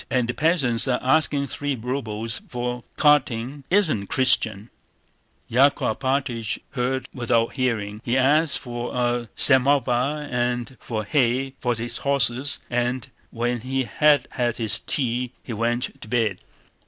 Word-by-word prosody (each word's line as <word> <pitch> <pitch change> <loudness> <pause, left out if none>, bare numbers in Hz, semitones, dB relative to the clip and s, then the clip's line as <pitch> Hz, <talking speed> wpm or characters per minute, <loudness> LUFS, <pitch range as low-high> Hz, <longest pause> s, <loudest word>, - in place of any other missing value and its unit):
And 125 -2 +1
the 125 - -1
peasants 140 -8 +2
are 125 -1 +2
asking 140 +1 +2
three 145 0 -3
rubles 115 -3 -3
for 125 0 -4
carting—it 140 -2 +2
isn't 160 - +2
Christian!" 110 -5 +1 0.8
Yákov 130 -2 +3
Alpátych 130 -4 -1
heard 130 0 -2
without 115 -2 0
heeding. 110 -5 -2
He 120 +2 0
asked 145 +4 +3
for 120 -2 -6
a 120 -1 0
samovar 135 +1 +3
and 125 -1 -2
for 110 -3 -4
hay 130 +2 +1
for 120 -2 0
his 120 +2 -4
horses, 140 0 +1
and 125 +1 -2 0.2
when 120 0 -2
he 130 +2 -1
had 145 +1 +3
had 120 -3 -1
his 110 -3 +2
tea 125 -2 -1
he 120 - -6
went 120 +3 -2
to - - -9
bed. 110 -5 0
125 Hz, 135 wpm, -23 LUFS, 120-135 Hz, 0.8 s, Yákov